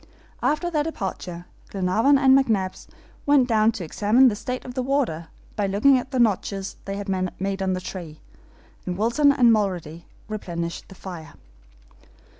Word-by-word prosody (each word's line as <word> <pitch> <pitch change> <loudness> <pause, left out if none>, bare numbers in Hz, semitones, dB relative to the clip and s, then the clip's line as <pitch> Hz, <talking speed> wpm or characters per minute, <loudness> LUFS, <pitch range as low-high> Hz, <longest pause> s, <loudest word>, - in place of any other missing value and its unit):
After 345 +4 0
their 305 -3 +1
departure, 185 - -5 0.2
Glenarvan 205 +9 +2
and 265 -1 +5
McNabbs 215 -9 0 0.4
went 285 -3 +5
down 220 -2 +3
to 210 -5 -5
examine 215 +10 +4
the 210 - -3
state 250 +4 -5
of 250 - -7
the 255 - -2
water 250 - -1 0.3
by 205 -2 0
looking 255 +8 +4
at 250 - -7
the 260 - -3
notches 200 -4 0
they 195 - -4
had 205 0 -6 0.3
made 195 +1 -2
on 190 -1 0
the 185 - -2
tree, 170 -4 -8 0.7
and 180 -1 -2
Wilson 240 +7 +3
and 245 -4 +5
Mulrady 175 -6 -2 0.2
replenished 170 -6 -5
the 190 - -12
fire. 175 -4 -9
210 Hz, 160 wpm, -24 LUFS, 185-255 Hz, 0.7 s, and